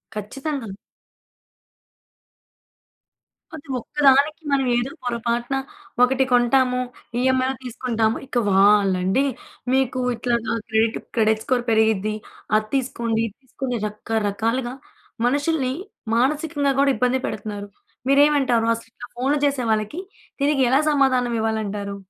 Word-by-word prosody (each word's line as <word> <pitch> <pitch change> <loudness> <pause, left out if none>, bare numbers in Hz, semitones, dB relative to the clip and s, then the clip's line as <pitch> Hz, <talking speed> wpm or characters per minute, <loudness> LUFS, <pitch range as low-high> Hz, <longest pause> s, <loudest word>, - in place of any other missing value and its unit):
ఖచ్చితంగా! 265 +4 -4 2.9
అది 285 - -11
ఒక్కదానికి 285 +4 +3
మనం 275 -1 +2
ఏదో 240 +3 -1
పొరపాటున 240 +1 -1 0.5
ఒకటి 265 +1 +3
కొంటాము. 250 +1 +3 0.4
ఈఎంఐలో 260 +1 +2
తీసుకుంటాము. 230 -2 -1
ఇక 250 - -4
వాళ్లండి, 195 +3 +4 0.5
"మీకు 260 -1 +1 0.2
ఇట్లాగా 235 -1 -1 0.2
క్రెడిట్ 220 +1 +2 0.2
క్రెడిట్ 220 -1 +3
స్కోర్ 255 -3 +1
పెరిగిద్ది, 220 -1 +2 0.4
అది 215 0 -2
తీసుకోండి, 235 -4 -1
ఇది 210 - -12
తీసుకోండి" 260 0 -4
అని 210 - -2
రకరకాలుగా 225 +3 -2 0.5
మనుషుల్ని 285 0 0 0.4
మానసికంగా 285 +2 +1
కూడా 280 0 +4
ఇబ్బంది 250 +1 +1
పెడుతున్నారు. 205 -1 -5 0.4
మీరేమంటారు 275 -5 +4
అసలు 230 0 -12
ఇట్లా 245 - -10
ఫోన్‌లు 275 +4 +1
చేసే 275 -3 0
వాళ్లకి? 215 - -1 0.4
దీనికి 285 -1 +2
ఎలా 265 +2 +4
సమాధానం 260 -4 +2
ఇవ్వాలంటారు? 210 -2 -2
245 Hz, 105 wpm, -22 LUFS, 220-270 Hz, 2.9 s, వాళ్లండి